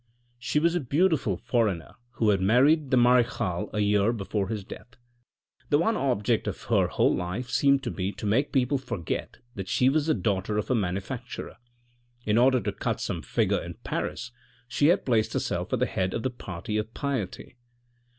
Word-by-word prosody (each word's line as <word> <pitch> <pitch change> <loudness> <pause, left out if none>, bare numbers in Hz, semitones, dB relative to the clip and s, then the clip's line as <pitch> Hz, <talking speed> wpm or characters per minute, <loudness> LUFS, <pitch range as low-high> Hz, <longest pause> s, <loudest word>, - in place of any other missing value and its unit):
She 135 +4 -2
was 165 +3 +3
a 175 - +1
beautiful 145 - +1
foreigner 105 -9 -1 0.2
who 110 - +1
had 95 -2 +1
married 135 +9 +4
the 130 - +3
marechal 120 -7 +2
a 105 - -1
year 105 +1 +3
before 100 -2 -2
his 105 -3 -4
death. 110 - -11 0.7
The 145 - +4
one 195 +8 +2
object 125 - 0
of - - -3
her - - +2
whole - - +2
life 100 +9 -4
seemed 140 +1 +3
to 120 - -2
be 95 +1 -2
to - - -7
make 120 +8 +1
people 135 0 +1
forget 85 - -4 0.2
that 95 -2 -6
she 125 +4 +3
was 150 +2 +1
the 155 - +3
daughter 100 +1 -1
of 105 - -2
a - - +3
manufacturer. 105 +5 -4 0.7
In 105 +2 +3
order 130 +1 +5
to - - -2
cut - - -3
some - - -3
figure - - 0
in - - -7
Paris 125 +1 -3 0.4
she 125 +5 +2
had 175 - +3
placed 115 -4 +1
herself - - -2
at - - +2
the - - +2
head 95 0 -2
of 115 - -3
the 130 - -1
party 100 -2 -5
of 105 +1 -3
piety. 130 -5 -4
120 Hz, 190 wpm, -27 LUFS, 100-135 Hz, 0.7 s, order